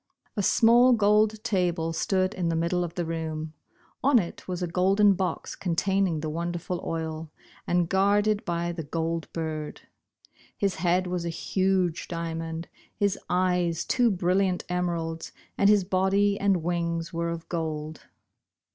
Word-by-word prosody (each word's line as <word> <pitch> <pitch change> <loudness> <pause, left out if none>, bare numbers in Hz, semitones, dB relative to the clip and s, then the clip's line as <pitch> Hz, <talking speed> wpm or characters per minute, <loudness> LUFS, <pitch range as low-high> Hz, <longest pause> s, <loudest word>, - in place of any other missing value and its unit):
A 205 - 0
small 240 +5 +5
gold 210 0 +3
table 175 -5 0
stood 185 +3 0
in 175 -2 -1
the 165 - 0
middle 170 +2 0
of 170 -1 -6
the 175 - -1
room. 160 -1 -4 0.5
On 275 -1 +5
it 175 -7 -3
was 180 -1 -3
a - - 0
orolden 195 +4 +3
box 185 0 -3
containing 185 -1 0
the 155 - -3
wonderful 170 +2 -3
oil, 160 -1 -4 0.4
and 175 -1 +2
guarded 205 +3 +2
by 170 -1 -2
the 170 -1 -5
Gold 165 +2 -3
Bird. 155 -2 -4 0.8
His 200 -2 +1
head 180 +2 +2
was 180 -1 -2
a 170 - -2
huge 185 0 0
diamond, 165 -1 -4 0.3
his 200 -2 +1
eyes 180 -2 +1
two 245 -2 +3
brilliant 185 -1 +1
emeralds, 170 -2 -2 0.2
and 200 - +4
his 205 -2 +5
body 195 +2 +2
and 195 -4 +2
wings 170 0 -2
were 170 0 -1
of 170 -1 -5
gold. 155 -2 -4
175 Hz, 145 wpm, -27 LUFS, 165-195 Hz, 0.8 s, small